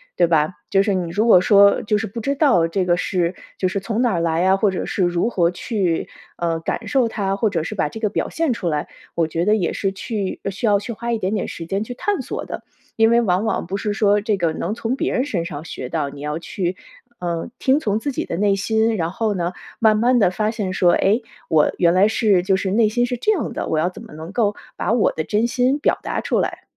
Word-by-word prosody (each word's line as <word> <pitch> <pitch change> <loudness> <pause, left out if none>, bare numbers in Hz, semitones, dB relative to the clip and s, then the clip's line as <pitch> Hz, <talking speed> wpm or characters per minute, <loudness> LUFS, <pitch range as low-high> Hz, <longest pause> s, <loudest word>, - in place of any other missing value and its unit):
对 175 - +4
吧？ 160 +1 +1 0.2
就 195 -1 +4
是 200 -1 +1
你 180 -2 -1
如 215 +5 +1
果 205 - +8
说 200 +1 +5
就 210 -1 +1
是 220 - -3
不 230 +4 -7
知 275 +5 -1
道 265 - +3
这 185 +3 -1
个 175 -1 +2
是 180 -1 -1 0.2
就 185 - +2
是 190 +2 -2
从 220 +4 -2
哪 240 -4 +2
儿 170 - 0
来 165 +1 +1
啊， 190 +1 +4
或 200 -1 +2
者 185 - -3
是 190 - 0
如 175 +5 +1
何 175 -7 +2
去， 180 -3 -2 0.3
呃， 165 -1 -1
感 - - -3
受 265 -5 +2
它， 195 -3 -2
或 215 +2 +1
者 175 -5 -1
是 160 - -5
把 - - +1
这 220 - -8
个 215 -2 0
表 - - -2
现 325 -4 -1
出 195 -6 -4
来， 150 -1 -2 0.3
我 165 -2 +1
觉 165 +2 -1
得 210 - +4
也 185 -6 0
是 195 - -1
去 195 0 -4
需 200 +5 -4
要 205 -2 +4
去 235 +3 -6
花 235 +2 -4
一 230 - 0
点 190 +4 -1
点 195 - -2
时 165 - -7
间 195 +4 -1
去 245 - -6
探 405 +10 -2
索 - - -5
的。 - - -7 0.3
因 225 0 +4
为 235 0 +5
往 190 0 +1
往 220 - -1
不 195 +3 -2
是 205 0 -2
说 205 -1 +3
这 210 0 0
个 170 -4 0
能 205 - -3
从 235 +2 -2
别 - - -1
人 250 - +1
身 185 -12 -2
上 145 -2 -6
学 130 -5 -6
到， 145 0 -2
你 140 0 -10
要 150 +2 -3
去， 180 +1 -3 0.4
呃， 170 -2 -3
听 270 +2 +3
从 215 -6 0
自 285 +4 -2
己 - - -3
的 - - -4
内 200 +1 +2
心， 220 +3 +1
然 165 0 -1
后 215 0 -1
呢 175 0 -2 0.2
慢 220 -1 +4
慢 245 +3 +3
地 200 -6 +4
发 215 +3 0
现 205 -5 -3
说： 175 -2 +4
“诶， 215 +5 +2 0.3
我 155 -2 +4
原 170 -1 +4
来 190 +3 +5
是 210 -4 +3
就 190 +1 +2
是 190 0 -1
内 215 0 +3
心 240 +3 +1
是 245 - -2
这 335 - +1
样 375 - -1
的， - - -3
我 160 - 0
要 165 +3 +2
怎 - - -11
么 - - -13
能 160 +4 -8
够 205 -2 +1 0.2
把 - - -1
我 230 -3 +3
的 155 - -3
真 210 +7 +1
心 250 +3 +1
表 295 - +1
达 - - -3
出 - - 0
来”。 - - -2
200 Hz, 285 characters per minute, -21 LUFS, 175-225 Hz, 0.4 s, 果